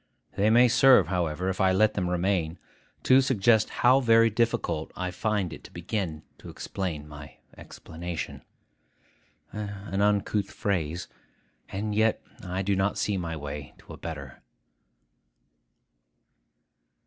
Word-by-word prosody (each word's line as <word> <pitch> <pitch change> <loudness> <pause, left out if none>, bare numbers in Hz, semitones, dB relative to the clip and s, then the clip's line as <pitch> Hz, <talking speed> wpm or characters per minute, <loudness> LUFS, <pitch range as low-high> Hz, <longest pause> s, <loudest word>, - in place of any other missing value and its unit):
They 105 +2 +2
may 120 +3 +6
serve, 125 - +5
however, 90 -1 -1
if 95 +1 -1
I 95 0 +4
let 105 +3 +3
them 90 -3 -1
remain, 90 -2 0 0.5
to 130 +1 +6
suggest 115 -4 +3 0.2
how 130 +2 +7
very 115 -2 +4
difficult 115 +2 -1
I 90 0 -3
find 105 -2 -1
it - - -11
to - - -12
begin 85 -3 -4 0.2
to - - -11
explain 80 -6 -5
my 75 0 -11 0.2
explanation. 85 +1 -7 1.1
An 100 -1 -4
uncouth 105 0 +1
phrase: 90 -5 -2 0.6
and 105 +2 -3
yet 110 +1 +2 0.2
I 90 +1 -3
do 100 +1 +1
not 95 +1 0
see 105 - 0
my 85 -3 -3
way 75 -1 -7
to - - -13
a - - -10
better. 70 -5 -8
95 Hz, 130 wpm, -27 LUFS, 85-105 Hz, 1.1 s, how